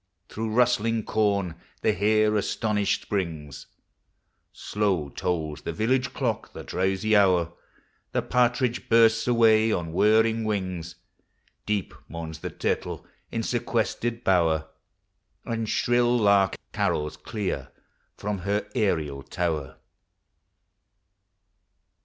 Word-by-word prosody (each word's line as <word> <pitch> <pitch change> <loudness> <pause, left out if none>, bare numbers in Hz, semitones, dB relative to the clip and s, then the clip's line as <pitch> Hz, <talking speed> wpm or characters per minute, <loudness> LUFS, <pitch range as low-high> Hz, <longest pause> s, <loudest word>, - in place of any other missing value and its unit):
43 - - -16
Through 110 0 -3
rustling 115 -2 +2
corn 100 -6 0 0.3
the - - +3
hare 110 +2 +2
astonished 105 0 0
springs; 80 -8 -4 0.8
Slow 95 -8 -1
tolls 80 -1 -3
the - - -4
village 125 +4 +1
clock 120 -5 -2
the - - -8
drowsy 95 +3 0
hour; 90 -4 +3 0.6
The - - 0
partridge 125 0 +1
bursts 115 0 +5
away 115 -2 +4
on 85 -5 -2
whirring 110 +4 +3
wings; 95 -5 -3 0.7
Deep 105 -2 -1
mourns 80 -1 -7
the - - -5
turtle - - -3 0.3
in 115 - -2
sequestered 120 0 -1
bower, 80 -4 +2 0.8
And 115 -2 -2
shrill 120 0 +2
lark 100 -3 +3 0.2
carols 75 0 0
clear 105 -4 -4 0.5
from 105 -1 -3
her 100 +3 -1
aerial 80 - 0
tower. 75 -2 -3
105 Hz, 105 wpm, -26 LUFS, 90-115 Hz, 0.8 s, bursts